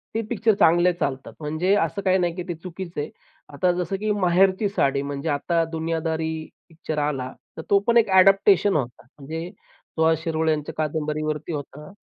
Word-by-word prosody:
ते 225 - +1
पिक्चर 225 -1 +2
चांगले 175 +2 +5
चालतात. 135 -6 -4
म्हणजे 155 +6 0
असं 200 0 0
काही 190 -1 +3
नाही, 175 -2 0
की 180 - -4
ते - - -1
चुकीचं 175 -1 -7
आहे. 150 - -5 0.4
आता 180 +6 +2
जसं, 180 +2 -2
की 215 +2 -1
माहेरची 190 +1 +2
साडी 140 -7 +1
म्हणजे 140 +2 -4
आता 165 +4 +1
दुनियादारी 160 0 -2 0.4
पिक्चर 160 -1 -6
आला. 130 -3 -3 0.3
तर - - -4
तो 200 - +5
पण 235 - +4
एक 225 -4 +4
अडॅप्टेशन 195 0 +5
होता. 125 -4 -3
म्हणजे 160 +5 -6
सुहास 160 -4 -2
शिरोळे 160 -1 0
यांच्या 150 -1 -5
कादंबरीवरती 155 +1 -2
होता. 150 +2 -7
165 Hz, 170 wpm, -23 LUFS, 150-185 Hz, 0.4 s, चांगले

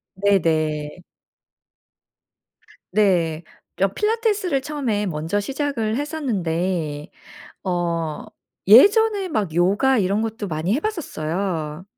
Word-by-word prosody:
네네. 160 -5 0 1.9
네. 175 -6 +1 0.4
려 195 0 +2
필라테스를 420 - 0
처음에 260 -8 -2
먼저 165 +3 -2
시작을 255 -2 -2
했었는데 180 - -2 0.6
어 170 -4 -2 0.4
예전에 405 - +6
막 205 - -2
요가 205 +9 +3
이런 200 +2 +1
것도 225 -2 -4
많이 170 +4 -1
해 290 - 0
봤었어요. 180 - -3
200 Hz, 195 characters per minute, -22 LUFS, 165-270 Hz, 1.9 s, 예전에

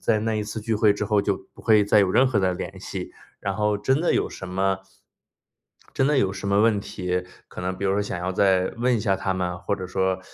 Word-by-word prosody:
在 110 -2 +2
那 110 0 -1
一 105 - -1
次 105 +1 -5
聚 110 +1 -1
会 105 -1 +4
之 105 +1 -3
后， 105 -1 +2
就 100 -2 0
不 - - -17
会 110 -3 +5
再 105 +1 +5
有 95 -2 +2
任 130 - +4
何 120 -6 +1
的 95 -1 +2
联 90 - -6
系， - - -6 0.3
然 100 -1 -3
后 105 0 +1
真 130 +7 +1
的 175 - +2
有 - - +1
什 95 - -8
么 95 +1 0 1.1
真 135 - +2
的 145 -2 +3
有 95 -4 +2
什 95 +1 -6
么 100 +1 +3
问 110 -2 +3
题， 90 -2 -3 0.2
可 - - -8
能 95 0 -2
比 100 - -5
如 95 - +2
说 105 - +1
想 95 -3 -4
要 90 +1 -2
再 95 -1 +3
问 125 +1 +2
一 - - -2
下 100 -2 +1
他 95 0 -1
们 90 -1 -1
啊， 90 - -5
或 100 - -2
者 95 -2 -6
说， 95 0 0
100 Hz, 285 characters per minute, -24 LUFS, 95-110 Hz, 1.1 s, 会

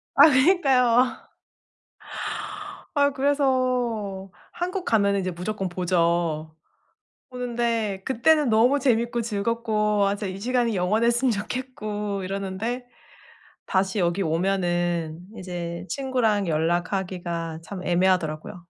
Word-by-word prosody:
아 285 +3 +9
그니까요. 260 -5 +4 1.8
아유 285 0 +4
그래서 255 -8 0 0.2
한국 360 +1 -3
가면은 200 -3 +2
이제 185 0 -2
무조건 190 +2 -3
보죠. 170 -3 0 0.7
보는데 235 -5 -2
그때는 280 +2 +3
너무 240 +6 +4
재미있고 235 -2 +1
즐겁고 210 -1 0
아 200 - +1
저 205 - -5
이 190 +1 -6
시간이 240 -1 0
영원했으면 235 +7 +2
좋겠고 210 -3 -4
이러는데 200 +6 -4 0.8
다시 190 +2 0
여기 175 +2 +1
오면은 175 -1 0 0.2
이제 175 -1 -5
친구랑 230 -8 0
연락하기가 170 0 -2
참 185 +1 -8
애매하더라고요. 180 -2 0
205 Hz, 255 characters per minute, -25 LUFS, 180-245 Hz, 1.8 s, 아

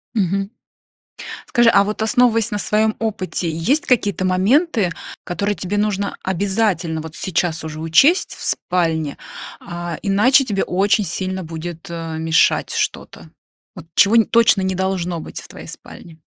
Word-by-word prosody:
Мгм. 195 0 -1 1.0
Скажи, 240 -1 +4
а 200 -3 +5
вот 210 +2 -4
основываясь 230 0 +2
на 210 - -1
своём 215 +1 +1
опыте, 195 -6 -2
есть 165 - 0
какие-то 205 -6 +1
моменты, 205 - +2 0.3
которые 200 +3 -2
тебе 185 +3 -3
нужно 205 -1 -1
обязательно 190 -3 -1
вот 160 0 -9
сейчас 165 -3 -1
уже 155 -1 -7
учесть 270 - +3
в - - -11
спальне, 160 -5 -1 0.4
а, 175 -1 -6
иначе 220 +7 +3
тебе 200 -5 -1
очень 200 +3 +1
сильно 185 +2 -3
будет, 165 +1 -7
э, 165 -1 -5
мешать, 160 0 +2
что-то? - - -4 0.5
Вот - - -10
чего 205 +3 +5
нь 225 -2 +5
точно 230 -4 +3
не 190 0 -1
должно 180 -2 -2
быть - - -8
в - - -14
твоей - - -11
спальне? 165 -2 -12
190 Hz, 145 wpm, -19 LUFS, 170-215 Hz, 1.0 s, а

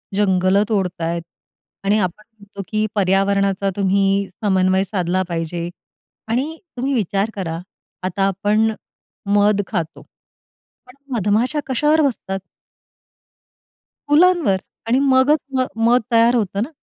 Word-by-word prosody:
जंगलं 190 0 +3
तोडतायेत 175 -4 -1 0.6
आणि 205 +2 +3
आपण 185 +3 -2 0.2
म्हणतो, 200 -1 -9
की 215 0 0
पर्यावरणाचा 195 0 +1
तुम्ही 195 0 +1
समन्वय 190 -1 +2
साधला 185 -2 -1
पाहिजे 170 0 -3 0.6
आणि 290 +7 -1 0.2
तुम्ही 270 +3 -1
विचार 200 -2 0
करा, 165 -4 -4 0.4
आता 190 +1 -1
आपण 210 +3 +1 0.6
मध 205 0 +3
खातो. 160 -1 -4 0.9
पण 250 - -16 0.2
मधमाशा 230 +7 +1
कशावर 300 +5 +3
बसतात? 225 -9 -1 1.7
फुलांवर? 320 - +4 0.3
आणि 250 +3 +3
मगच 260 +4 +5 0.2
अ, - - +1
म 225 0 0
मध 245 +1 +4
तयार 230 +1 +5
होतं 205 -2 0
ना. 270 - -6
200 Hz, 115 wpm, -20 LUFS, 190-230 Hz, 1.7 s, मगच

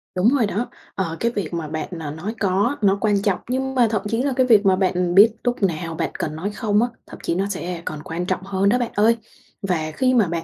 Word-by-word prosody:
Đúng 185 +5 +4
rồi 260 -3 +3
đó. 215 +4 -2 0.3
Ờ, 165 -4 -2
cái 235 - +1
việc 195 -8 -4
mà 165 -2 -3
bạn, 155 +1 -4
à, 150 -2 -5
nói 180 +9 -5
có 200 +7 +1
nó 200 -1 +3
quan 205 -2 +2
trọng, 200 -3 +1
nhưng 265 +1 -1
mà 245 -2 +4
thậm 215 -2 0
chí 225 +3 0
là 280 -1 0
cái 260 0 +3
việc 215 -4 +5
mà 190 -1 +5
bạn, 190 0 +1
ừm, 180 -1 0
biết 210 +4 +8
lúc 245 -3 -1
nào 165 -2 -1
bạn - - -1
cần 155 - -2
nói 185 +6 -3
không 210 -1 +1
á, 240 - +2 0.2
thậm - - -11
chí 170 - 0
nó 190 +2 0
sẽ 180 -3 -4
còn 155 - -4
quan 170 +2 -4
trọng 185 0 -1
hơn 195 0 +1
đó 240 - +3
bạn 240 -1 -2
ơi. 225 +3 +4 0.4
Và 170 -6 -1
khi 255 -1 +2
mà 225 -6 +4
bạn 165 0 -3
195 Hz, 270 wpm, -22 LUFS, 175-230 Hz, 0.4 s, biết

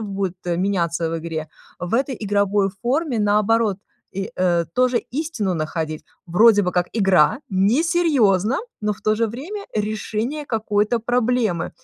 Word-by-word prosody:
б 215 - -4
будут 195 -2 -3
меняться 170 -2 0
в 165 - -2
игре- 160 -1 -5 0.3
в 180 +5 -3
этой 265 +1 0
игровой 200 -1 +1
форме, 265 0 0
наоборот, 210 0 +2 0.4
и, 195 +5 -5
э, 175 -2 +1
тоже 250 -1 +3
истину 255 - -2
находить. 155 0 -3 0.2
Вроде 205 +4 +5
бы 180 - -1
как 175 -1 0
игра, 195 -2 +3
несерьёзно, 240 - +2 0.2
но 210 0 0
в - - -12
то 215 - +2
же 230 +1 +1
время 315 - -6
решение 215 +7 -2
какой-то 215 0 0
проблемы. 235 -6 0
210 Hz, 140 wpm, -21 LUFS, 185-240 Hz, 0.4 s, Вроде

